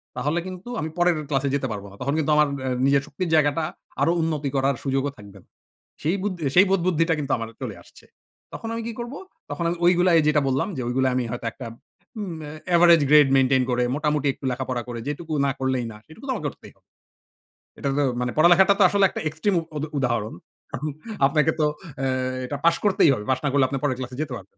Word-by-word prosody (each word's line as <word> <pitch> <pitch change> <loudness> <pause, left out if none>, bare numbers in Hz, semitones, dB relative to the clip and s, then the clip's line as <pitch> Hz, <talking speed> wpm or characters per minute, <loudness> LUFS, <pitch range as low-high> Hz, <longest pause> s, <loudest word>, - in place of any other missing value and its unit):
তাহলে 155 +4 -1
কিন্তু 185 +4 -8
আমি 160 - -3
পরের 175 -1 +3
ক্লাসে 140 0 0
যেতে 135 -2 -1
পারব 100 -2 -5
না। 100 - -13
তখন 140 +2 -1
কিন্তু 155 -1 +1
আমার 150 0 +4 0.2
অ্যা 130 - -1 0.2
নিজের 140 0 +4
শক্তির 165 +5 -4
জায়গাটা 150 +1 +2 0.4
আরো 165 - +4
উন্নতি 155 -3 -1
করার 135 0 +2
সুযোগও 135 +1 0
থাকবে 100 -1 -13
না। - - -35 0.6
সেই 165 +6 +1
বুদ 205 -1 -1 0.2
সেই 185 - +8
বোধবুদ্ধিটা 170 -3 +2
কিন্তু 140 -2 -2
আমার 115 -1 -5
চলে - - -4
আসছে। - - -19 0.5
তখন 225 - -6
আমি 230 - -3
কি 235 - -3
করবো? 240 +4 -6 0.3
তখন 170 - -3
আমি 175 - -1
ঐগুলায় 175 0 +4
এই - - -1
যেটা 150 -1 +3
বললাম 135 +7 0
যে - - -3
ঐগুলোয় 130 +1 +1
আমি 130 - 0
হয়তো 120 0 -5
একটা 125 +1 -9 0.5
উম 185 -5 -4
এ - - -7 0.2
এভারেজ 170 -1 +7
গ্রেড 150 -2 +7
মেইনটেইন 130 -1 +3
করে 125 0 +1
মোটামুটি 150 -1 0
একটু - - -17
লেখাপড়া 125 -1 -3
করে 120 -1 -5
যেটুকু 155 +2 -5
না - - +1
করলেই 130 -2 0
না - - -12
সেটুকু 160 - -14
তো 260 - +1
আমাকে - - -4
করতেই - - -15 1.1
এটা 140 - -1
তো - - +3 0.2
মানে 125 -1 -1
পড়ালেখাটা 175 +5 +6
তো - - +7
আসলে 200 +1 +3
একটা - - -5
এক্সট্রিম 170 +6 -1 0.2
উদ 145 - -3
উদাহরণ। 120 -5 -1 0.4
এখন 150 +4 -3 0.4
আপনাকে 150 +2 +2
তো 155 - +3 0.3
অ্যা 135 0 -1 0.4
এটা 145 +2 -4
পাশ 170 - +5
করতেই 190 -6 +4
হবে। 105 -5 -4
পাস 130 - +2
না - - +2
করলে 140 -2 +4
আপনি 135 - -3
পরের 130 -4 0
ক্লাসে 125 -1 -6
যেতে 150 -4 -4
পারবেন 95 0 -16
145 Hz, 215 wpm, -24 LUFS, 130-170 Hz, 1.1 s, সেই